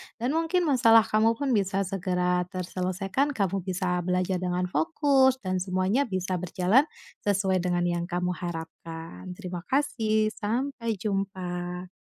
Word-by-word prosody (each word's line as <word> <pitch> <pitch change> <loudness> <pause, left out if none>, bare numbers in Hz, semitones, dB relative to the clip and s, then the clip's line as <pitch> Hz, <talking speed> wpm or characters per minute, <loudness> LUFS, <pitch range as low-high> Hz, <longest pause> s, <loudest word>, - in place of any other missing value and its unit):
dan 240 +2 -2
mungkin 330 +3 +1
masalah 230 -7 +6
kamu 220 +1 +2
pun 275 +2 -1
bisa 195 -3 +1
segera 180 -2 0
terselesaikan, 185 +9 -2
kamu 195 -2 0
bisa 180 -1 -1
belajar 180 +1 0
dengan 180 0 -1
fokus 260 - +3
dan 185 -1 -1
semuanya 185 +8 +1
bisa 185 -2 -2
berjalan 185 - +3 0.4
sesuai 195 -2 +2
dengan 175 0 0
yang 175 -1 0
kamu 180 0 -1
harapkan. 165 +1 -7
Terima 180 -3 -6
kasih, 220 -6 +1
sampai 230 +2 -2
jumpa. 185 -3 -3
185 Hz, 130 wpm, -27 LUFS, 180-225 Hz, 0.4 s, masalah